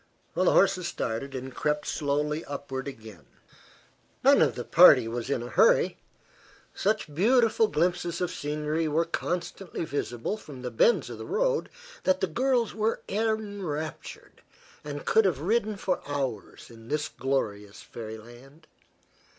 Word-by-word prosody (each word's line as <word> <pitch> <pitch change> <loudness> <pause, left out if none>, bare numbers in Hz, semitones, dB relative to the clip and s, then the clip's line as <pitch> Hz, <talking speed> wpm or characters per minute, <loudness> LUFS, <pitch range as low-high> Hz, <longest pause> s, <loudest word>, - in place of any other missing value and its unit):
The 180 +3 +1
horses 185 -1 +3
started 135 +4 -4
and 130 0 -6
crept 150 +3 -1
slowly 150 +1 -1
upward 140 -1 -5
again. 110 - -10 1.0
None - - +6
of - - +3
the - - -4
party 115 - +7
was 120 +2 -4
in 125 -4 -1
a 120 - -7
hurry. - - +3 0.7
Such 210 -7 -1
beautiful 225 - +3
glimpses 175 -1 0
of 180 - -1
scenery 150 +2 -2
were 160 +3 +1
constantly 175 +1 -4
visible 140 - -3
from 140 -11 -11
the 125 - -4
bends 175 - +3
of - - -8
the - - -6
road - - 0 0.3
that 185 0 +2
the - - +2
girls 240 +6 0
were 220 +1 -1
enraptured, 200 -8 -4 0.4
and 145 -1 -6
could 220 -1 +4
have 180 -7 +2
ridden 215 +4 +1
for 185 -1 -1
hours 135 -7 -4
in 115 -1 -14
this 150 +2 -1
glorious 105 -8 -3
fairyland. 120 +6 -11
150 Hz, 140 wpm, -27 LUFS, 130-190 Hz, 1.0 s, party